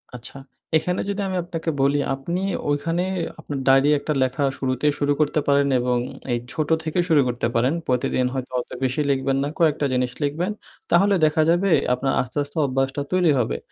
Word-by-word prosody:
আচ্ছা, 125 Hz, +3 st, -7 dB, 0.4 s
এখানে 180 Hz, +3 st, -1 dB
যদি 200 Hz, 0 st, -2 dB
আমি 185 Hz, -1 st, -2 dB
আপনাকে 165 Hz, -1 st, -4 dB
বলি 140 Hz, +1 st, +3 dB, 0.2 s
আপনি 170 Hz, +7 st, -3 dB, 0.3 s
ওইখানে 165 Hz, +4 st, 0 dB, 0.4 s
আপনার 145 Hz, -2 st, -5 dB
ডায়েরি 135 Hz, +2 st, +5 dB
একটা 150 Hz, +1 st, -2 dB
লেখা 130 Hz, +2 st, -1 dB, 0.2 s
শুরুতেই 130 Hz, +2 st, +1 dB
শুরু 145 Hz, 0 st, +2 dB
করতে 155 Hz, 0 st, +2 dB
পারেন 140 Hz, 0 st, +3 dB
এবং 125 Hz, 0 st, +1 dB, 0.4 s
এই 120 Hz, -, 0 dB
ছোট 155 Hz, -2 st, -2 dB
থেকেও 160 Hz, +3 st, 0 dB
শুরু 155 Hz, -3 st, +5 dB
করতে 120 Hz, -1 st, -1 dB
পারেন। 125 Hz, +5 st, +2 dB
প্রতিদিন 125 Hz, 0 st, +1 dB
হয়তো 130 Hz, -1 st, -4 dB
অত -, -, -6 dB
বেশি 130 Hz, +3 st, 0 dB
লিখবেন 135 Hz, 0 st, 0 dB
না। -, -, -1 dB
কয়েকটা 155 Hz, -3 st, +2 dB
জিনিস 125 Hz, 0 st, 0 dB
লিখবেন। 160 Hz, +7 st, -1 dB, 0.4 s
তাহলে 195 Hz, +4 st, +4 dB
দেখা 155 Hz, +1 st, +2 dB
যাবে 175 Hz, +4 st, +3 dB, 0.2 s
আপনার 135 Hz, +2 st, -1 dB
আস্তে, 125 Hz, +3 st, -7 dB
আস্তে 145 Hz, +3 st, -8 dB
অভ্যাসটা 135 Hz, +1 st, -1 dB
তৈরি 180 Hz, -4 st, +3 dB
হবে। 110 Hz, -, -1 dB
145 Hz, 180 wpm, -23 LUFS, 130-165 Hz, 0.4 s, ডায়েরি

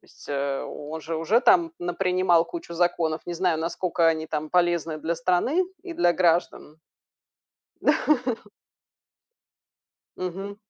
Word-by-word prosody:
То -, -, -30 dB
есть, -, -, -17 dB
э, 140 Hz, -1 st, -1 dB
о -, -, -6 dB, 0.2 s
он 160 Hz, +1 st, -5 dB
же 160 Hz, +1 st, -4 dB
уже 180 Hz, +9 st, +2 dB
там 345 Hz, +1 st, +4 dB
напринимал 180 Hz, -1 st, +2 dB
кучу 335 Hz, -, -8 dB
законов, 170 Hz, -2 st, 0 dB
не 175 Hz, -, -4 dB
знаю, 170 Hz, -2 st, +1 dB
насколько 170 Hz, 0 st, 0 dB
они 160 Hz, -1 st, 0 dB
там 155 Hz, -1 st, -4 dB
полезны 175 Hz, -3 st, +1 dB
для 165 Hz, +2 st, -2 dB
страны 180 Hz, -, +1 dB, 0.2 s
и 360 Hz, -, -7 dB
для 325 Hz, -, +3 dB
граждан. 170 Hz, -3 st, 0 dB, 1.0 s
Да. 255 Hz, -5 st, +2 dB, 1.8 s
Мгм. 195 Hz, +3 st, -5 dB
175 Hz, 135 wpm, -25 LUFS, 160-195 Hz, 1.8 s, там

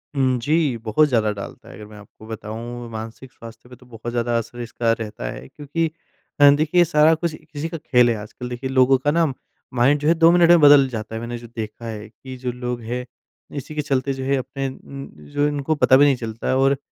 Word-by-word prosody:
उम, 130 Hz, -2 st, +2 dB
जी। 150 Hz, 0 st, +1 dB
बहुत 115 Hz, +7 st, +2 dB
ज़्यादा 110 Hz, -4 st, +2 dB
डालता 100 Hz, -1 st, -9 dB
है -, -, -11 dB
अगर 105 Hz, +2 st, -10 dB
मैं 105 Hz, -, -13 dB
आपको 105 Hz, +1 st, -15 dB
बताऊँ 115 Hz, +2 st, -7 dB
मानसिक 115 Hz, +3 st, -8 dB
स्वास्थ्य 115 Hz, -1 st, -13 dB
पे 125 Hz, -, -12 dB
तो 125 Hz, -, -20 dB
बहुत 120 Hz, 0 st, -7 dB
ज़्यादा 120 Hz, 0 st, 0 dB
असर 115 Hz, +1 st, -5 dB
इसका 115 Hz, 0 st, -1 dB
रहता 105 Hz, -, -5 dB
है -, -, -9 dB
क्योंकि 160 Hz, +3 st, -3 dB, 0.5 s
अ, 145 Hz, 0 st, +9 dB
देखिए 160 Hz, +4 st, +3 dB
सारा 155 Hz, 0 st, +4 dB
कुछ 165 Hz, 0 st, -3 dB, 0.2 s
इसी 145 Hz, +3 st, -3 dB
का 165 Hz, -, -5 dB
खेल 125 Hz, -5 st, +3 dB
है 115 Hz, -, +1 dB
आजकल। 110 Hz, +4 st, -8 dB
देखिए 125 Hz, +2 st, -5 dB
लोगों 130 Hz, 0 st, +4 dB
का 145 Hz, +3 st, 0 dB
ना 170 Hz, +1 st, +2 dB
अम 145 Hz, -, 0 dB, 0.4 s
माइंड 135 Hz, +4 st, +3 dB
जो 150 Hz, -, 0 dB
है 165 Hz, -, +6 dB
2 165 Hz, 0 st, +5 dB
मिनट 175 Hz, -1 st, +5 dB
में 175 Hz, -1 st, +7 dB
बदल 145 Hz, -2 st, +7 dB
जाता 110 Hz, -2 st, -6 dB
है 110 Hz, -, -4 dB
मैंने 120 Hz, 0 st, -5 dB
जो 120 Hz, 0 st, -11 dB
देखा 110 Hz, +1 st, -6 dB
है 110 Hz, -1 st, -6 dB
कि 130 Hz, +2 st, -11 dB
जो 125 Hz, 0 st, -3 dB
लोग 125 Hz, 0 st, -5 dB
हैं, 125 Hz, +2 st, -4 dB, 0.5 s
इसी 145 Hz, +2 st, -7 dB
के 150 Hz, -, 0 dB
चलते 135 Hz, -2 st, -1 dB
जो 135 Hz, 0 st, -6 dB
है 140 Hz, +1 st, +1 dB
अपने 135 Hz, +1 st, -4 dB
उम, 135 Hz, +1 st, -10 dB, 0.3 s
जो 145 Hz, 0 st, +2 dB
इनको 145 Hz, +1 st, -1 dB
पता 130 Hz, -3 st, +5 dB
भी 145 Hz, -, +6 dB
नहीं 140 Hz, -2 st, +4 dB
चलता 115 Hz, -2 st, -6 dB
है 130 Hz, -, +2 dB
और 135 Hz, +1 st, +3 dB
125 Hz, 240 wpm, -21 LUFS, 115-145 Hz, 0.5 s, अ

